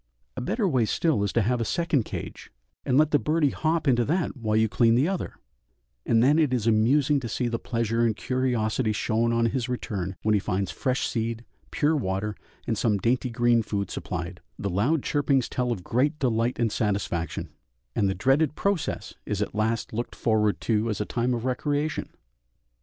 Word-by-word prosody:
A - - -4
better 210 - 0
way 130 -9 +2
still 130 -2 +1
is 100 - 0
to 115 - +3
have 120 +3 0
a - - +2
second 150 -1 0
cage, - - -7 0.4
and 130 - +3
let 155 0 +4
birdie 150 -2 +2
hop 160 0 0
into 120 -2 +4
that 170 +1 0
while 110 -4 -1
you 110 0 +4
clean 115 +1 +3
the 135 +6 +3
other, 190 -1 -3 0.7
and 115 0 +4
then 145 +5 +4
it 150 -5 +3
is 115 -4 -2
amusing 130 +6 +3
to 120 -3 -6
see 125 - -1
the 115 -1 -2
pleasure 115 -1 0
and 115 -2 +2
curiosity 120 -2 0
shown 115 +2 +1
on 115 0 +2
his 120 +1 -1
return 95 -7 -3
when 110 - +3
he 105 - +4
finds 95 -1 -2
fresh 130 0 -1
seed, 115 0 -3 0.2
pure 155 +2 +1
water, 105 -4 -2 0.3
and - - -1
some 105 -3 +2
dainty 125 +5 0
green 120 0 +3
food 100 -3 -3
supplied; 90 0 -5 0.2
the 100 - -3
loud 125 - +1
chirpings 140 -3 +1
tell 125 -1 -1
of 100 -7 -3
great 140 - +1
delight 120 -3 0
and 115 -2 +1
satisfaction, 100 - -2 0.5
and 100 -3 +2
the 95 - -1
dreaded 135 - +2
process 200 -4 -1
is 105 -2 -1
at 105 - -2
last 110 +2 -1
looked 120 +3 -4
forward 105 -2 +1
to 110 0 0
as 105 - -2
a 105 - -1
time 120 +3 0
of 120 +1 -4
recreation. 145 +4 -1
115 Hz, 190 wpm, -26 LUFS, 110-135 Hz, 0.7 s, let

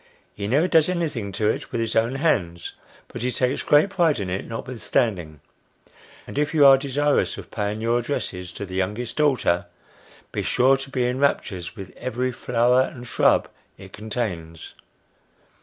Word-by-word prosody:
He 100 -1 -5
never 145 - +3
does 165 -2 +4
anything 150 - -2
to 105 - 0
it - - -6
with - - -2
his 115 -1 -2
own 115 +3 +2
hands; 90 - 0 0.4
but - - -8
he 125 +1 0
takes 125 +2 0
great 150 +7 +4
pride 165 - +2
in 95 -3 -3
it 95 - -3
notwithstanding; 110 - -2 0.8
and - - -4
if 150 +1 0
you 145 -2 +6
are 135 -1 +9
desirous 140 +2 0
of - - -10
paying 105 0 -3
your 115 +1 +2
addresses 90 -8 -4
to 100 - -5
the 95 - -10
youngest 105 +6 -2
daughter, 130 - +2 0.6
be - - -2
sure 130 +2 +3
to 135 0 -8
be 130 -2 0
in 125 +1 -1
raptures 95 -11 -1
with 95 -4 -10
every 130 +1 -2
flower 125 +1 +2
and 125 -2 -4
shrub - - +3 0.3
it - - -13
contains. 100 -7 -5
120 Hz, 170 wpm, -23 LUFS, 100-135 Hz, 0.8 s, are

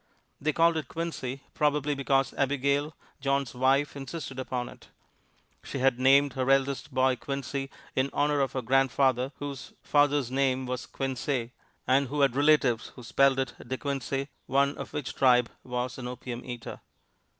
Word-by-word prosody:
They 155 +2 +2
called 165 +1 +3
it 155 -5 -3
Quincy, 140 -6 -4
probably 150 -1 +1
because 135 -1 +1
Abigail, 140 +2 0 0.2
John's 140 -2 0
wife, 135 +3 +2
insisted 135 -1 -6
upon 125 -1 -3
it. - - -13 0.7
She - - -6
had 130 -1 +2
named 135 +1 +5
her 130 0 -1
eldest 135 +1 +1
boy 130 0 +3
Quincy, 140 +1 -4 0.3
in 130 +1 +1
honor 145 0 +1
of 135 - 0
her 130 - -2
grandfather, 130 0 +2
whose 140 -2 -7
father's 145 -3 +2
name 130 -1 +1
was 125 0 -4
Quinsey, 130 -2 -2 0.3
and 135 +2 +3
who 145 +3 -1
had 135 -3 +3
relatives 140 -5 +3
who 125 - -11
spelled 135 +3 +3
it 130 -2 -1
De 130 +2 -2
Quincey, 140 0 -3 0.2
one 140 +1 +2
of - - -7
which 145 -4 -4
tribe 125 -2 +4
was 125 0 -3
an 125 - -5
opium 125 -1 -6
eater. 120 -2 -7
135 Hz, 160 wpm, -28 LUFS, 130-140 Hz, 0.7 s, named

